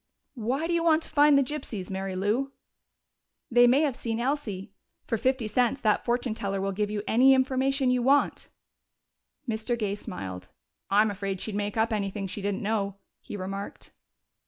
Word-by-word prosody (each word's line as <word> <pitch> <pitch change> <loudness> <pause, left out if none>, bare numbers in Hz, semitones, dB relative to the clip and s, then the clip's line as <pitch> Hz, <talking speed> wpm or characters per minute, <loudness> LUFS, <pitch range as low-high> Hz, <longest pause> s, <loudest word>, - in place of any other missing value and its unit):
"Why 260 +8 -1
do 345 - -1
you 335 -1 +1
want 325 -1 +4
to - - -9
find 290 -1 +5
the 275 - +4
gypsies, 240 -9 -5
Mary 190 0 -3
Lou?" 215 +9 0 1.0
"They 245 0 +6
may 260 +4 +5
have 285 -5 +1
seen 230 -3 -3
Elsie. 225 -7 -3 0.3
For - - -1
fifty 255 0 0
cents 245 +4 +1
that 215 -2 +2
fortune 240 -1 0
teller 195 -2 -3
will 195 +1 -1
give 205 +1 -1
you 210 -1 -3
any 265 +4 +6
information 265 0 +1
you 250 -1 +2
want." 275 +4 +2 1.0
Mr. 225 +1 -1
Gay 210 -3 -1
smiled. 95 - -7 0.4
"I'm 210 +2 +4
afraid 195 -1 -4
she'd 215 - -4
make 205 +1 -2
up 225 +1 +2
anything 200 -1 -2
she 195 +2 -6
didn't 200 0 -2
know," 200 -2 -1 0.2
he 205 - -8
remarked. 195 +1 -6
220 Hz, 175 wpm, -27 LUFS, 200-260 Hz, 1.0 s, They